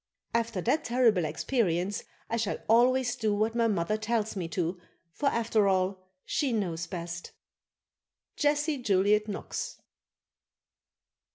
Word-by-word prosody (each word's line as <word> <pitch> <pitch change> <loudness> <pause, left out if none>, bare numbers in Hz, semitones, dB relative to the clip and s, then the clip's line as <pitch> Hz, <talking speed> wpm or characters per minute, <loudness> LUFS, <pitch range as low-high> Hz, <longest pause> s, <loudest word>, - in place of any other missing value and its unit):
After 230 -4 0
that 300 - +1
terrible 230 -8 +3
experience 180 - 0 0.2
I 230 - -1
shall 215 -2 -1
always 245 +2 +4
do 215 -2 0
what 215 +2 +1
my 230 -1 +2
mother 205 0 0
tells 220 -1 -1
me 180 -4 -3
to, 175 +1 -2 0.3
for 285 - -1
after 225 -5 +2
all, 185 0 +1 0.2
she 280 -4 0
knows 175 -6 -1
best. 170 -1 -6 1.0
Jessie 295 0 +1
Juliet 210 -1 +3
Knox. 205 - -4
215 Hz, 120 wpm, -29 LUFS, 185-235 Hz, 1.0 s, always